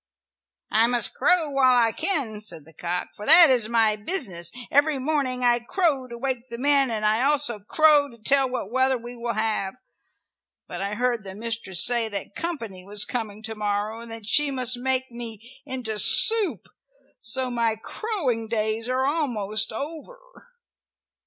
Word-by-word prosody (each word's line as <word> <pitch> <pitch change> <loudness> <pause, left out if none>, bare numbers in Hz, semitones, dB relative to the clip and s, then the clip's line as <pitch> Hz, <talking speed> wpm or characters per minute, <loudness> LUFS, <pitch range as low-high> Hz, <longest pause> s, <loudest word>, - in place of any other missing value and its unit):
"I 225 +2 +3
must 240 -2 +1
crow 345 -5 0
while 260 -2 +2
I 230 -2 +2
can," 235 - -3
said 170 -8 -7
the 160 - -19
cock, 175 +3 -5
"for 205 - -11
that 325 -1 +7
is 235 -4 +1
my 225 -2 +1
business. 205 - -4 0.2
Every 290 +1 +2
morning 260 -2 -2
I 240 0 +2
crow 275 0 -2
to 235 -1 -10
wake 260 0 -5
the 235 - -7
men, 275 0 +1
and 215 -2 -3
I 215 +2 +1
also 280 -5 -1
crow 295 +6 +2
to 235 - -17
tell 270 +4 +1
what 250 -5 -6
weather 260 +1 +1
we 240 +1 -11
will 235 -1 -5
have. 215 -2 -3 0.9
But - - -8
I 200 +1 -4
heard 240 -1 -2
the 190 -1 -9
mistress 220 -5 +1
say 235 -2 +1
that 200 -1 -7
company 230 - -7
was 205 +2 +3
coming 215 -3 -6
to 220 0 -5
morrow 210 +1 -4
and 235 - -12
that 225 -2 -8
she 290 +7 +2
must 255 -2 0
make 260 +1 -2
me 235 +1 -10
into 245 -5 -2
soup, 445 - +8 0.5
so 250 +2 0
my 230 -2 -1
crowing 255 - -4
days 220 +1 -2
are 260 +1 -1
almost 225 -9 -1
over." 315 - -8
235 Hz, 170 wpm, -23 LUFS, 215-270 Hz, 0.9 s, soup